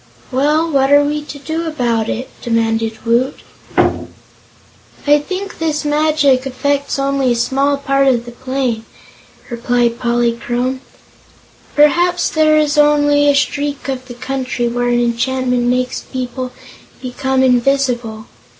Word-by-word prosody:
"Well, 300 +5 +2
what 270 -1 +2
are 290 0 +6
we 295 +1 -1
to 290 - -8
do 320 +4 -4
about 235 -7 -1
it?" 255 +3 -3
demanded 225 -1 -1
Woot. 240 +4 +1 0.4
"I 295 0 -2
think 375 +6 -6
this 310 -2 -1
magic 295 -3 +2
affects 280 +2 -1
only 275 -2 +1
a - - +2
small 275 +4 +1
part 275 0 +1
of 240 -3 +2
the 240 - -8
plain," 255 -2 -3 0.7
replied 235 0 0
Polychrome; 240 +2 -1 0.9
"perhaps 345 +4 +3
there 310 -1 +3
is 300 0 +2
only 290 -1 +4
a 285 - +4
streak 285 0 -1
of 260 -1 -4
the 245 - -9
country 255 -1 -3
where 245 +1 -1
an 240 0 +2
enchantment 250 +1 0
makes 250 0 0
people 255 0 -5 0.5
become 265 +1 -1
invisible. 245 -3 +1
265 Hz, 130 wpm, -16 LUFS, 245-290 Hz, 0.9 s, are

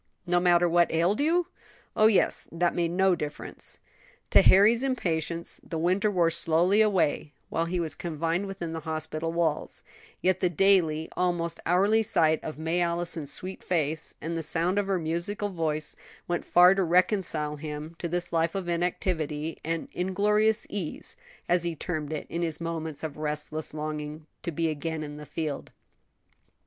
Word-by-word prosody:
"No 175 0 +2
matter 175 0 +4
what 170 0 +3
ailed 170 +6 +2
you?" 335 +4 +2 0.5
"Oh, 215 - +6
yes; 215 -3 +2
that 170 +1 +1
made 170 -1 0
no 190 +2 +3
difference." 150 -4 -5 0.5
To - - +8
Harry's 215 +5 +6
impatience 170 - -1
the 165 - -5
winter 185 +6 +2
wore 175 -4 +2
slowly 175 +7 +3
away 185 -7 +1 0.2
while 165 - 0
he 175 +1 -2
was 165 -2 -1
confined 165 +3 -2
within 175 -4 -5
the 165 - -3
hospital 155 +1 -3
walls; 165 -3 -1 0.4
yet 185 0 +2
the 180 - +2
daily, 170 -3 +3
almost 175 -2 0
hourly 200 +6 +4
sight 160 -7 +2
of 155 - -6
May 165 +3 0
Allison's 170 -3 -1
sweet 185 +1 -5
face, 160 -3 -1
and 165 +1 -4
the 165 - -2
sound 170 +5 +1
of 200 - -1
her 195 -1 +1
musical 175 +5 -2
voice, 155 -4 -1 0.3
went 175 0 -2
far 180 +1 +7
to 195 - 0
reconcile 170 -4 +1
him 150 +2 -6
to 170 - -2
this 175 +1 -3
life 165 +1 +1
of 190 -2 -3
inactivity 165 -3 -2
and 165 0 -2
"inglorious 210 +4 +2
ease," 185 -7 -6 0.3
as 175 0 +3
he 170 -1 -2
termed 155 -2 -4
it 155 - -4
in 170 - -3
his 165 -2 -2
moments 160 -3 -4
of 150 -2 -5
restless 150 +1 -3
longing 150 0 -5 0.2
to 170 - -3
be 165 +1 0
again 160 +1 -3
in 145 0 -7
the 150 -1 -10
field. 155 -4 -4
170 Hz, 165 wpm, -27 LUFS, 160-180 Hz, 0.5 s, To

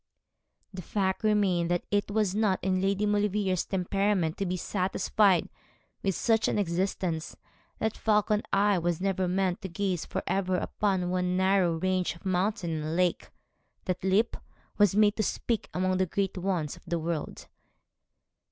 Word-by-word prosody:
The 185 - -6
fact 190 +3 -1
remained 195 -5 +2
that 175 0 0
it 205 0 +1
was 205 -2 +1
not 205 -3 +2
in 185 0 +1
Lady 200 +2 +1
Maulevrier's 205 -3 +1
temperament 195 -2 0
to 195 - -2
be 180 +1 -1
satisfied 190 0 +1 0.5
with 195 -2 0
such 225 -1 +2
an - - 0
existence; 180 -3 -2 0.4
that 220 0 -1
falcon 210 -1 +2
eye 200 -1 +3
was 170 -1 -1
never 190 -1 0
meant 185 +1 0
to 190 - -5
gaze 180 -1 -2
for - - -4
ever 185 -1 0
upon 190 -2 -1
one 180 0 0
narrow 190 -2 +3
range 185 0 0
of 170 - -18
mountain 190 0 0
and 155 +2 -3
lake; 180 0 0 0.6
that 185 0 -2
lip 195 +5 +2 0.4
was 205 -2 +4
made 210 0 +4
to - - +1
speak 225 +1 -2
among 185 0 0
the 185 0 +1
great 195 +2 -1
ones 180 -5 -2
of - - -16
the 170 0 0
world. 165 -1 -4
190 Hz, 160 wpm, -28 LUFS, 180-205 Hz, 0.6 s, was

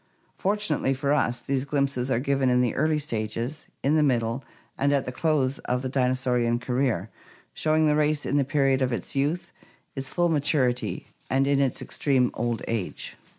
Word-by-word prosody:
Fortunately 190 -9 +1
for 140 +2 0
us 125 -4 +1
these 135 -1 -1
glimpses 140 -2 -1
are 130 - +2
given 135 0 +1
in 125 0 +3
the 125 -2 +2
early 155 +2 +1
stages, 120 +1 -4 0.2
in 140 - +3
the 155 - +4
middle, 120 -2 +1 0.3
and 140 +1 +1
at 140 -2 +2
the 125 - -3
close 140 -2 0
of 125 +1 -1
the 130 - -2
dinosaurian 125 -2 +1
career, 125 -5 -1 0.4
showing 155 0 +2
the 150 -1 +3
race 150 0 +1
in 145 - +1
the 140 - +3
period 135 -1 +2
of 130 -1 +1
its 120 - -3
youth, 145 +6 -1 0.4
its 135 -1 -3
full 175 -1 +1
maturity, 140 -5 0 0.2
and 135 +1 +2
in 140 0 +2
its 135 -3 0
extreme 130 -4 +1
old 120 0 -2
age. 115 -5 -3
135 Hz, 180 wpm, -26 LUFS, 125-145 Hz, 0.4 s, the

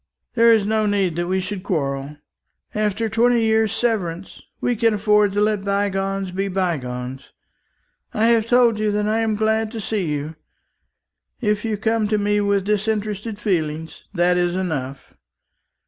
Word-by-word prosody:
There 230 -1 +5
is 220 -3 +4
no 215 0 +1
need 195 -5 +1
that 175 0 -1
we 190 +1 0
should 190 +1 -4
quarrel. 140 -5 -3 0.6
After 215 +1 0
twenty 235 +2 +3
years' 220 -1 +2
severance, 200 -7 -2 0.2
we 245 - 0
can 225 0 +2
afford 210 0 +3
to 205 - +1
let 210 -2 +1
bygones 195 -1 -1
be 195 +2 -2
bygones. 135 -9 -3 0.8
I 215 - +1
have 230 -1 +3
told 240 -3 +4
you 215 0 +1
that 210 0 0
I 220 +1 +1
am 220 -1 0
glad 220 +1 +1
to 225 - -4
see 205 -3 -2
you. 150 +1 -4 1.0
If 210 -3 0
you 220 -2 -1
come 220 +1 0
to 215 0 +1
me 205 0 +1
with 200 -1 +1
disinterested 210 +1 -2
feelings, 160 -6 -2
that 180 -2 +2
is 175 0 +1
enough. 145 -8 -4
205 Hz, 160 wpm, -21 LUFS, 180-220 Hz, 1.0 s, There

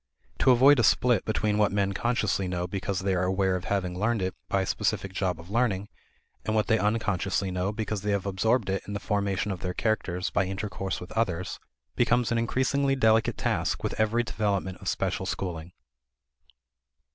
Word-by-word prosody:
To - - +4
avoid 130 +3 +7
a - - +4
split 120 -1 +3
between 105 -1 0
what 105 - +3
men 100 -1 0
consciously 105 -3 0
know 90 -1 -2
because 95 +1 -3
they 95 0 0
are 90 0 +1
aware 95 0 +1
of 90 - -4
having 95 -3 -1
learned 110 -1 +1
it 95 - -1 0.2
by 95 -1 +1
a - - -2
specific 95 +1 -1
job 90 -3 -1
of 85 +4 -12
learning, 105 -4 0 0.5
and 110 - -1
what 105 -2 +2
they 110 - +2
unconsciously 100 -3 0
know 90 +2 -1
because 105 -1 -3
they 105 - -2
have 100 -1 0
absorbed 100 +2 +1
it 95 - -1
in 100 - -5
the 100 - -2
formation 100 -1 -1
of 95 - -4
their 90 0 -4
characters 95 -4 -1
by 100 - +1
intercourse 95 0 -4
with 90 - -10
others, 95 -6 -1 0.4
becomes 120 0 +2
an 115 - +2
increasingly 135 +4 +1
delicate 110 -3 +3
task - - -1
with - - -1
every 110 +2 +2
development 100 -5 -2
of - - -9
special - - -1
schooling. 85 -3 -4
100 Hz, 190 wpm, -27 LUFS, 95-110 Hz, 0.5 s, avoid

